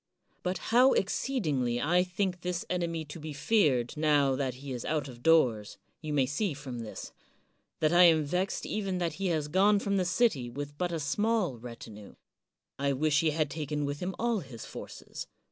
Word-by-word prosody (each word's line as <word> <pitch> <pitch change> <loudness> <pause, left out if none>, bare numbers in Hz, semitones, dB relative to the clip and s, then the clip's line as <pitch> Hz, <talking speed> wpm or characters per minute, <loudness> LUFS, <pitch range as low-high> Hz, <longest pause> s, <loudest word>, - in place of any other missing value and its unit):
But 185 +1 -1 0.2
how 255 +3 +7
exceedingly 150 - 0
I 175 +7 +3
think 180 0 -2
this 180 -1 -3
enemy 170 -3 -1
to 150 +3 -9
be 155 0 -6
feared 145 - +2
now 145 -3 +3
that 130 -2 -2
he 135 +1 -8
is 125 -2 -4
out 150 -3 -1
of 120 -2 -11
doors, 120 -10 +3 0.2
you 155 -1 -5
may 140 -3 +3
see 150 +5 -1
from 135 -4 -7
this, 115 -2 -7 0.4
— - - -46
^that 155 - +4
I 175 +1 +7
am 160 -2 +5
vexed 180 +6 -1
even 195 -3 -2
that 170 -3 -1
he 195 - +1
has 155 -4 0
gone 195 +6 +4
from 200 0 0
the 185 - +1
city 180 - +1
with 145 +3 -6
but 175 +3 -2
a 165 - -2
small 185 - 0
retinue. 110 -3 -10 0.6
I 140 0 +1
wish 145 +2 +2
he 165 - +2
had 155 -1 0
taken 150 -1 -2
with 145 +1 -3
him 185 +1 -3
all 235 -2 +1
his 130 -9 -9
forces. - - -8
155 Hz, 195 wpm, -30 LUFS, 140-180 Hz, 0.6 s, how